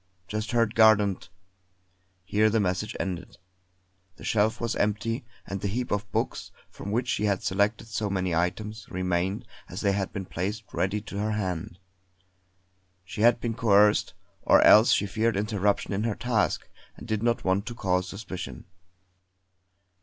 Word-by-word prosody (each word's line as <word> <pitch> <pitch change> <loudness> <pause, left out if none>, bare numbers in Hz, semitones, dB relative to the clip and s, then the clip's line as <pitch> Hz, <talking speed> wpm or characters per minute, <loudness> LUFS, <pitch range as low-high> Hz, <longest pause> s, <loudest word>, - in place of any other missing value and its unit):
Just 110 +1 -3
heard 115 -2 +2
Gardent 105 -6 +4 0.5
" 95 0 -42 0.2
Here 105 +3 +2
the 110 +1 +2
message 100 +2 -1
ended. 90 -2 -4 0.8
The - - -14
shelf 110 +2 +1
was 115 -1 -2
empty; 115 +4 -1 0.2
and 95 -1 -5
the 100 - -1
heap 120 +5 -3
of 105 -2 -2
books, - - -2 0.2
from 100 - -7
which 120 +4 0
she 105 - 0
had 100 -2 0
selected 100 +4 0
so 110 -2 -2
many 95 -2 -1
items, 105 +5 -2
remained 95 +5 -1 0.2
as - - -6
they 100 - +2
had 95 -1 -2
been 100 -2 -5
placed 100 +5 -3
ready 100 +3 0
to 100 -1 -7
her 105 +1 -1
hand. 90 -4 -3 1.3
She 105 +3 -6
had 120 +1 +5
been 115 -1 -2
coerced; 105 -3 +3 0.3
or - - +5
else 110 +2 +7
she - - +3
feared 110 +1 0
interruption 105 -1 0
in 100 +2 -1
her 115 -3 -1
task, 120 -4 0 0.3
and - - -10
did 110 -2 -1
not 115 0 +1
want 95 +3 0
to 120 - -5
cause 95 -4 0
suspicion. 95 - -7
105 Hz, 160 wpm, -27 LUFS, 95-110 Hz, 1.3 s, else